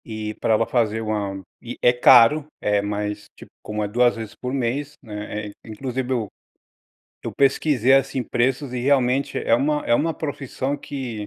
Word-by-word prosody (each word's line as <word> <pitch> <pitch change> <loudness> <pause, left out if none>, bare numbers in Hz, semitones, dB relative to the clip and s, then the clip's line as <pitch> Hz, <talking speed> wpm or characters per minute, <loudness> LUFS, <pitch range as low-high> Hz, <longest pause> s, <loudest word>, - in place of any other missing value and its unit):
E 110 -1 -5
pra 110 - +2
ela 110 +1 +2
fazer 115 -3 0
1, 105 -3 -3 0.2
e 120 0 -8
é 120 - +5
caro, 125 +4 +6
eh, 105 -1 +1
mas 105 0 -3
tipo, - - -14
como 105 0 -3
é - - -1
2 120 +3 +2
vezes 110 -2 -7
por 125 - -5
mês, 135 +3 -2
né, 105 -1 -6
eh, - - -8
inclusive 125 +3 -4
eu 120 -5 0 1.0
eu - - -4
pesquisei 135 -2 +3
assim, 135 -1 +1
preços 125 +2 -1
e 125 - -2
realmente, 135 0 +1
é - - +2
uma 150 +4 +1
é 120 - +3
uma 165 +7 +1
profissão 140 -2 -4
que 125 -8 -6
120 Hz, 175 wpm, -22 LUFS, 110-135 Hz, 1.0 s, caro